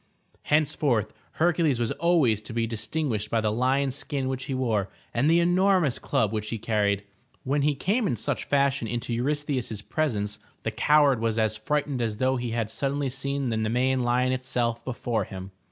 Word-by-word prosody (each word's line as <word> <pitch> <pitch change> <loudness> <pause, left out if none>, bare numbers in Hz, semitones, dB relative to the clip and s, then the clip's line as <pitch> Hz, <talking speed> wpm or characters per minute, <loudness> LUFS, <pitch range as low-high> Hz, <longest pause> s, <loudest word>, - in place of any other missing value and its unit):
Henceforth 145 -7 +1 0.2
Hercules 165 -6 +2
was 115 -2 0
always 155 - +2
to 110 - -9
be 115 0 0
distinguished 115 0 -2
by 115 - +1
the 110 -1 +1
lion's 130 +3 +1
skin 140 -2 -3
which 130 0 -3
he 135 - -3
wore 110 -6 0 0.2
and 130 +6 +2
the 165 +1 +5
enormous 175 -5 +3
club 110 -1 0
which 110 0 -2
he 115 - -2
carried. 105 -2 0 0.4
When 140 +2 +1
he 145 0 +2
came 210 - 0
in 125 - 0
such 110 - -2
fashion 140 -4 +1
into 120 +1 -3
Eurystheus' 130 -4 -1
presence, 105 -10 -1 0.2
the - - -1
coward 145 -4 +4
was 115 -1 0
as 110 -1 +2
frightened 140 +3 -1
as 110 -2 -1
though 130 +2 +1
he 120 -1 -3
had 115 -1 -2
suddenly 140 +1 -1
seen 140 0 -2
the 110 - -1
Nemean 125 +4 +1
lion 125 +1 +2
itself 125 -2 -1
before 115 -4 -2
him. 95 0 -8
125 Hz, 180 wpm, -26 LUFS, 110-145 Hz, 0.4 s, the